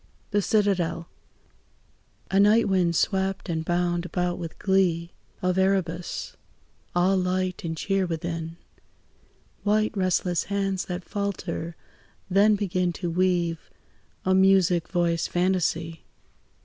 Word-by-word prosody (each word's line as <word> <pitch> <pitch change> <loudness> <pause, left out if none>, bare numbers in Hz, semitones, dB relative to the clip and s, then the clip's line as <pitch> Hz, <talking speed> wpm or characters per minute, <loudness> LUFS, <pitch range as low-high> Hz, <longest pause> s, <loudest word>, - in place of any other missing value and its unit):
THE 205 0 +2
CITADEL 190 -5 +1 1.2
A 195 - +3
night 210 +3 +5
wind 180 -3 +2
swept 190 +1 0
and 160 -1 -1
bound 175 0 0
about 180 -1 -2
with 165 -2 -6
glee 180 -3 +1 0.3
Of 185 0 +1
Erebus; 185 -3 -1 0.6
all 180 +2 +3
light 185 0 -1
and 160 -1 -3
cheer 195 +2 0
within; 165 0 -4 1.0
White 215 +1 +1
restless 185 -2 +1
hands 195 -2 -1
that 180 0 -5
falter, 185 -5 -4 0.6
then 205 +3 +5
begin 185 -3 0
To 175 0 -4
weave 175 -2 0 0.6
a 185 - +3
music 190 -3 +4
voiced 170 -2 0
fantasy. 175 -3 0
180 Hz, 110 wpm, -25 LUFS, 170-195 Hz, 1.2 s, night